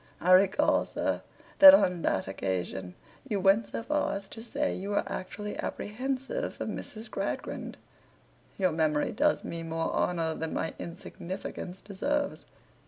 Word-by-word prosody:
I 180 - +2
recall, 190 +1 +5
sir, - - -1 0.4
that 290 0 +12
on 180 -10 +2
that 95 - 0
occasion 95 -1 -3 0.3
you 205 -3 0
went 195 +3 +4
so - - -5
far 295 -4 0
as 195 0 -10
to 225 - -9
say 285 +5 -1
you 195 +2 -5
were 205 - +1
actually 210 +2 -5
apprehensive 265 - -3
of - - -3
Miss 220 +1 -6
Gradgrind.' - - -4 0.8
'Your 185 -2 +2
memory 155 -2 +1
does 295 +7 +2
me 170 - -5
more 165 0 -2
honour 165 -2 0
than 160 0 -4
my 160 - -2
insignificance 180 +1 -7
deserves. 285 +9 -2
195 Hz, 145 wpm, -29 LUFS, 165-230 Hz, 0.8 s, that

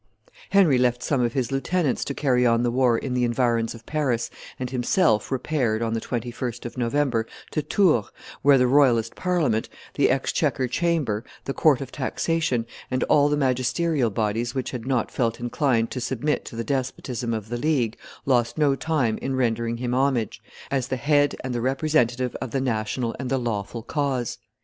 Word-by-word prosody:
Henry 180 -10 +5
left 125 0 +1
some 140 -4 +1
of 120 -1 0
his 130 -1 -1
lieutenants 135 +2 0
to 140 - -4
carry 125 -4 +2
on 115 -1 +3
the 120 - +1
war 125 -2 +3
in 130 +2 -3
the 125 0 +1
environs 120 -1 +1
of 115 0 -14
Paris, 130 -7 -1 0.3
and 125 -1 -4
himself 130 - +2
repaired, 125 -4 0
on 115 -1 -1
the 115 - -1
21st 120 0 -4
of 120 - -6
November, 125 -2 0 0.2
to 155 - 0
Tours, 150 - +2 0.3
where 140 0 +6
the 125 - +4
royalist 125 -4 +3
Parliament, 155 -12 0 0.2
the - - +3
exchequer 130 - +1
chamber, 140 -6 0 0.2
the 135 - -2
court 145 -4 +3
of 130 -2 -6
taxation, 140 -3 -1 0.2
and 130 0 0
all 145 0 +4
the 150 - +1
magisterial 130 +1 +1
bodies 110 +4 -1
which 130 - -2
had 125 -1 -6
not 130 -4 0
felt 115 -2 -1
inclined 120 -1 0
to 125 - -4
submit 130 +4 -1
to - - -8
the 115 - -2
despotism 130 -2 -2
of 110 -2 -3
the 120 - -2
League, 130 -6 +1 0.3
lost 120 -2 +1
no 145 -3 +3
time 135 -8 0
in 135 0 -2
rendering 115 -2 0
him 125 0 -2
homage, 130 -4 0 0.3
as 135 -3 0
the 130 - -2
head 145 +2 +2
and 130 -1 -3
the 120 - -2
representative 130 -2 +1
of 130 - -3
the 135 - -1
national 115 -1 -1
and 130 -1 -3
the 135 - +1
lawful 115 -2 -3
cause. 135 -3 -2
125 Hz, 185 wpm, -24 LUFS, 115-140 Hz, 0.3 s, where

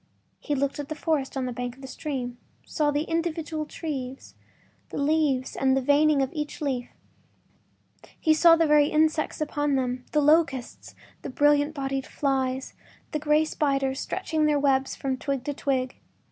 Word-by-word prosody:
He 290 - -2
looked 280 +1 -1
at 290 - -5
the 310 - -3
forest 300 -4 -1
on 260 - -1
the 250 - -3
bank 245 0 -4
of 270 - -16
the - - -6
stream, 255 -3 -5 0.3
saw 300 -2 0
the 290 +1 0
individual 325 -2 -2
trees, 270 -6 -6 0.6
the - - -6
leaves 285 -3 +1
and 265 0 +2
the - - +1
veining 290 +1 +4
of 265 - -4
each 300 -2 -4
leaf—he 265 -5 -2 1.4
saw 330 +1 +7
the 330 0 +3
very 300 -1 +5
insects 310 0 +1
upon 290 -1 0
them: 255 -1 -1
the 300 - +2
locusts, 290 -4 +1 0.3
the - - -6
brilliant 290 +3 +3
bodied 270 -1 -3
flies, 265 -2 -1 0.4
the 305 - -1
gray 300 +1 +3
spiders 275 -3 0
stretching 320 -5 -1
their 300 -1 +3
webs 270 -1 +1
from 265 -2 -2
twig 275 -1 -3
to 290 - -3
twig. 260 -2 -1
285 Hz, 165 wpm, -26 LUFS, 265-305 Hz, 1.4 s, saw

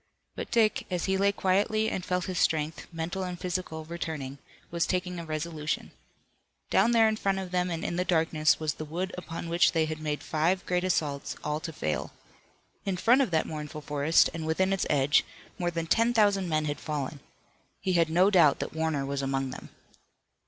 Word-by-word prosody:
But - - -5
Dick, 220 -2 +2
as 180 -2 -1
he 190 - +1
lay 200 +1 +3
quietly 205 +3 +1
and 190 - -2
felt 180 0 -1
his 185 -2 -2
strength, 155 -1 0
mental 165 +3 -3
and 180 -1 -4
physical, 175 -3 -3
returning, 155 -5 -5 0.3
was 170 0 0
taking 180 -1 -1
a 170 - -6
resolution. 155 -1 -3 0.8
Down - - +4
there 225 -2 +5
in 215 0 0
front 195 -2 0
of 190 -2 -5
them 180 0 +1
and 165 -1 -3
in 170 - -2
the 180 - +2
darkness 160 -3 +2
was 155 -2 -1
the 155 - -7
wood 175 +5 -4
upon 170 -1 -6
which 170 +2 +3
they 160 -2 +2
had 155 0 -4
made 150 -1 -3
five 170 +5 0
great 180 0 0
assaults, 150 -6 -1
all 150 0 -1
to 165 - -5
fail. 75 - -3 0.7
In 195 -2 -2
front 245 +8 +5
of 265 - +1
that 160 -2 +1
mournful 150 -1 -6
forest, 145 +2 +3
and 160 -1 -4
within 190 +4 +2
its 195 - 0
edge, 145 0 +4 0.4
more 175 -1 +1
than 165 -1 -3
ten 230 +7 +2
thousand 200 -4 +3
men 155 -1 +1
had 145 -1 -2
fallen. 145 -1 -4 0.6
He 185 - -1
had 165 -2 +3
no 180 +5 +4
doubt 170 -7 +5
that - - -5
Warner 160 -3 -1
was 140 0 -2
among 135 -1 -1
them. - - -9
165 Hz, 200 wpm, -28 LUFS, 155-185 Hz, 0.8 s, there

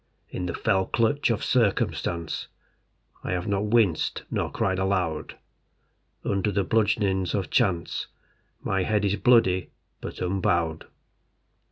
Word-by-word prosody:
In 90 - -3
the 85 - -3
fell 95 -4 +1
clutch 120 +6 +1
of 115 - 0
circumstance 95 -7 0 0.8
I - - -2
have 90 -1 -2
not 100 0 0
winced 105 -7 +2
nor - - -1
cried 95 -1 0
aloud. 90 -5 -1 0.9
Under 100 +1 0
the 100 0 +1
bludgeonings 100 -3 +1
of 95 -3 -2
chance 95 -9 0 0.6
My 95 0 0
head 105 +2 +1
is 100 0 +2
bloody, 110 -7 +3 0.3
but - - -7
unbowed. 85 -3 0
95 Hz, 125 wpm, -26 LUFS, 90-105 Hz, 0.9 s, bloody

